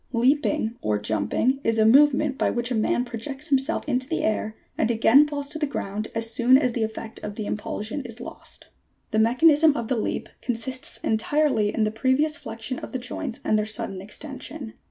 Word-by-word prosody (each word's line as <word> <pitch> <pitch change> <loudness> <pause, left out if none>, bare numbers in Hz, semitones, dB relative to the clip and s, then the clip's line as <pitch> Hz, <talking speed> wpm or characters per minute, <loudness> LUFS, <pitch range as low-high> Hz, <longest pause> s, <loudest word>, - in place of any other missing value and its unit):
91. 235 -2 0
Leaping 285 -5 0
or 105 -1 +1
jumping 110 - 0
is 225 0 +1
a 220 - +4
movement 275 +3 +5
by - - +1
which 240 +1 -2
a - - +1
man 235 +3 +1
pro 235 -2 -6
jects 275 +6 -6
himself 275 +3 +1
into 255 -2 0
the 325 - -1
air 215 0 -1 0.2
and 225 - +1
again 235 +5 +5
falls 285 -1 -4
to 310 - -4
the 300 - 0
ground 215 -5 -4
as 225 0 -1
soon 240 +3 +5
as 255 -3 +1
the 235 - -2
effect 220 0 -6
of 205 - -6
the 215 - -4
impulsion 210 +5 -4
is 235 -1 -9
lost. 240 - -10
92. - - -27 0.4
The 220 - +2
mechanism 305 +3 +5
of 235 -2 -4
the 255 - +1
leap 215 - -2
consists 255 +2 -3
entirely 225 -1 +1
in 225 - 0
the 215 - +1
previous 260 +7 +1
flexion 225 +2 -5
of - - -9
the - - 0
joints 245 -2 -5
and 215 - +3
their 210 - -1
sudden 195 -3 -4
extension. 270 +3 -7
240 Hz, 210 wpm, -25 LUFS, 220-280 Hz, 0.4 s, movement